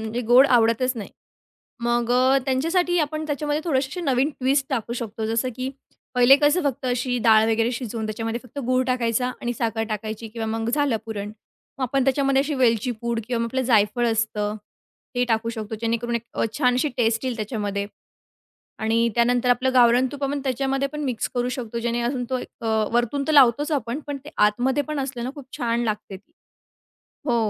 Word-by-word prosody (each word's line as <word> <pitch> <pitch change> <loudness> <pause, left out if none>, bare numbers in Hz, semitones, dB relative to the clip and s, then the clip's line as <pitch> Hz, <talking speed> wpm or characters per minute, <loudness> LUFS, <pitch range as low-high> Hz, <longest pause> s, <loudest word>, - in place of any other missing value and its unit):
म्हणजे 220 +2 -3
गोड 260 +3 +8
आवडतच 240 +1 +3
नाही. 210 - -6 0.7
मग 240 0 0
अ, 260 +2 +4
त्यांच्यासाठी 335 +7 +1
आपण 310 0 -1
त्याच्यामध्ये 295 +1 -1
थोडेसे 265 -5 +1
असे 360 - -5
नवीन 275 -2 +1
ट्विस्ट 270 +1 +2
टाकू 235 -2 -2
शकतो. 225 -2 -4
जसं, 230 +3 0
की 260 +1 -3 0.4
पहिले 250 +2 +7
कसं 295 +5 +3
फक्त 275 -1 -1
अशी 250 0 0
डाळ 220 0 +7
वगैरे 225 +1 +2
शिजवून 230 -2 -4
त्याच्यामध्ये 225 +2 -3
फक्त 250 +4 -10
गूळ 255 0 +2
टाकायचा 250 0 0
आणि 240 0 -2
साखर 225 -1 -1
टाकायची 215 +1 -5
किंवा 225 0 -5
मग 225 - -2
झालं 285 -5 +1
पुरण. 205 -2 -4 0.5
मग - - -3
आपण 265 +1 0
त्याच्यामध्ये 270 0 +2
अशी 295 0 -2
वेलची 245 -2 +2
पूड 235 -1 -1
किंवा 245 -2 -1
मग - - +1
आपलं 260 +3 -1
जायफळ 230 0 +2
असतं, 215 -2 -1 0.6
ते 245 0 +2
टाकू 230 -1 0
शकतो. 220 -1 -5
जेणेकरून 235 +1 -1
एक 235 - -5
अ, - - 0
छान 250 -3 +3
अशी 260 +4 +1
टेस्ट 225 -1 +1
येईल 255 -2 -2
त्याच्यामध्ये 205 -3 -3 1.0
आणि 230 +1 +2
त्यानंतर 245 +1 +2
आपलं 255 +1 +2
गावरान 245 +1 +5
तूप 285 - -8
पण 280 +1 -1
त्याच्यामध्ये 270 +1 0
पण 300 +2 -6
मिक्स 245 -4 -2
करू 245 0 0
शकतो. 235 -2 -5
जेणे 235 +1 -1
अजून 245 +1 -1
तो 255 - 0
एक - - -7 0.2
अ, - - -1 0.3
वरतून 240 +4 +1
तर - - +2
लावतोच 290 +2 +5
आपण, 250 -1 -1
पण 290 -1 -3
ते 300 - -9 0.2
आतमध्ये 255 +7 0
पण 305 0 -4
असलं 260 -3 -4
ना, 255 - -3
खूप 285 -3 -10
छान 235 -1 0
लागते 210 -3 -3
ती. 260 +12 -23 0.9
हो 245 -5 +1
245 Hz, 190 wpm, -23 LUFS, 230-270 Hz, 1.0 s, गोड